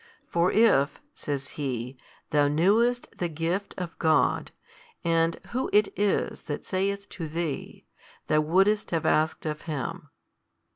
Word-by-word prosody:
For 170 +1 +1
if 170 -11 +4
(says 140 -2 -4
He,) 130 -3 -4 0.4
thou 145 -2 +4
knewest 215 +11 +2
the 175 - 0
gift 170 +5 -2
of 175 -3 -5
God 160 -1 +2 0.5
and 165 -1 +2 0.2
Who 255 +2 -1
It 210 -1 +4
is 205 -1 0
That 145 - -4
saith 200 +2 -1
to 165 -3 -6
thee, 160 -1 -4 0.4
thou 155 - +3
wouldest 195 +7 +2
have 165 -2 -1
asked 155 +1 +1
of 150 -1 -3
Him. 150 -6 -5
165 Hz, 135 wpm, -27 LUFS, 150-200 Hz, 0.5 s, if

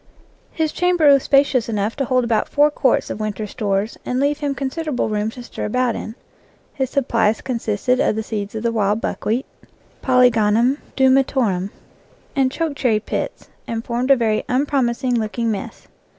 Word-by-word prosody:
His 315 -2 -1
chamber 355 -4 +3
was 275 - +4
spacious 275 -4 +2
enough 210 0 -1
to 275 - 0
hold 255 0 +2
about 235 -2 0
four 295 +1 +3
quarts 265 -3 +1
of - - -5
winter 215 0 -3
stores 205 +1 -2
and 250 - -2
leave 285 +2 +1
him 285 -2 -2
consider 280 +4 -3
able 250 -5 -1
room 210 0 -1
to 245 +2 -9
stir - - -6
about 250 +2 0
in. 220 - -6 0.6
His 265 -2 -2
supplies 230 -5 +1
consisted 240 0 -1
of 220 - +2
the 220 - -2
seeds 210 -1 -5
of 220 - -4
the 235 - +1
wild 210 -1 +1
buckwheat 230 +3 -2 0.6
(Polygonum 245 0 +3 0.2
du 265 -1 +4
metorum) 240 -8 +1 0.7
and 265 -2 +2
choke 320 0 -2
cherry 245 -6 +1
pits, 215 - -5 0.2
and 230 0 -4
formed 245 +2 -2
a 275 - +8
very 220 -3 0
unpromising 255 -2 +1
looking 225 +1 -1
mess. 200 -2 -6
245 Hz, 175 wpm, -20 LUFS, 215-270 Hz, 0.7 s, a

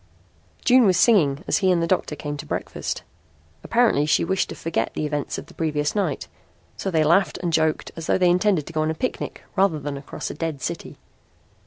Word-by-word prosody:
June 250 -3 +6
was 185 - +3
singing 165 - +4
as - - +2
he 190 -3 +3
and 175 - +3
the 165 - +1
doctor 165 -3 0
came 145 0 -5
to 145 - -7
breakfast. - - -4 0.6
Apparently 230 -11 +3
she 155 - +3
wished 190 +2 0
to - - -6
forget 165 - -2
the 155 - -1
events 150 -1 -2
of - - -7
the - - -16
previous 150 -2 -1
night, 185 -9 -1 0.5
so 195 - -3
they 160 -4 +2
laughed 170 +1 +3
and 170 -2 -1
joked 160 -1 +1
as 165 -1 -6
though - - +3
they 185 -1 +3
intended 180 -4 +2
to 165 - -10
go 155 - 0
on 155 - 0
a 160 - -1
picnic 255 +10 -4
rather 190 -5 +2
than 145 0 -4
across 140 - -6
a - - -6
dead 160 -2 -3
city. 170 +5 -5
165 Hz, 215 wpm, -23 LUFS, 150-190 Hz, 0.6 s, June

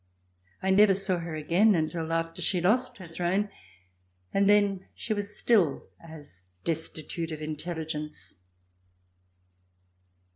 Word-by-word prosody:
I 190 - +2
never 195 0 +6
saw 190 -2 -1
her 165 -1 -5
again 175 +8 +3
until 160 0 -1
after 165 0 -1
she 185 - +2
lost 230 +8 +2
her 185 - -9
throne, 180 +5 -1 0.8
and 200 0 +3
then 200 -2 +3
she 225 - -2
was 205 0 -4
still 190 -12 +2
as 150 - -12 0.2
destitute 160 0 -3
of 155 -2 -5
intelligence. 155 - -5
170 Hz, 115 wpm, -28 LUFS, 160-200 Hz, 0.8 s, never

